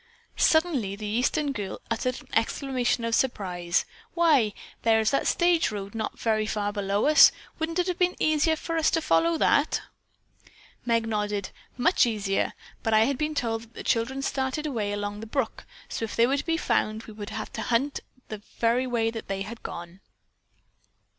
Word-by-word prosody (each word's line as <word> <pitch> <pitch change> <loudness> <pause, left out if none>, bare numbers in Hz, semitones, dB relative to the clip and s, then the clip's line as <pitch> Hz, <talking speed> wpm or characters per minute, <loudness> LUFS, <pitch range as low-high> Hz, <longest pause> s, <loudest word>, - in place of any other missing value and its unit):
Suddenly 305 - +2
the 210 +1 -7
Eastern 255 +7 0
girl 205 -7 -5
uttered 250 +3 -1
an - - -19
exclamation 250 -1 0
of 230 - -1
surprise. 180 -9 0 0.3
"Why, 300 -11 +4 0.3
there 225 -1 +4
is 220 0 +2
the 275 - +1
stage 345 -1 +3
road 200 -1 -6
not 220 -1 -4
very 215 -2 0
far 205 -1 -1
below 200 0 0
us. 305 +1 +8 0.3
Wouldn't 325 +1 -2
it 360 - +2
have 360 -1 -2
been 360 0 +2
easier 310 +1 +3
for 330 +1 -4
us 320 - +3
to 330 - +1
follow 165 - +2
that?" 290 +2 +2 1.0
Meg 230 -1 +2
nodded. 210 -2 -2 0.3
"Much 295 +1 +4
easier, 205 -3 -1 0.3
but 225 -1 +1
I 215 - +6
had 255 +3 +1
been 305 0 -1
told 225 -4 -1
that 230 0 -16
the - - -7
children 260 +4 0
started 265 +3 -1
away 225 -8 -2
along 205 0 -3
the 225 - -7
brook, 230 0 -2 0.2
so - - -4
if 225 - -4
they 230 - +5
were 270 +3 +1
to 285 - -3
be 325 0 +1
found 215 -7 0
we 220 - -11
would 210 -1 -7
have - - -6
to 225 - -4
hunt 250 +5 0 0.3
in 215 -1 -5 0.2
the 240 +3 +2
way 225 -2 +1
they 195 -4 -4
had 225 +3 -9
gone." 175 +2 -8
230 Hz, 185 wpm, -26 LUFS, 210-280 Hz, 1.0 s, us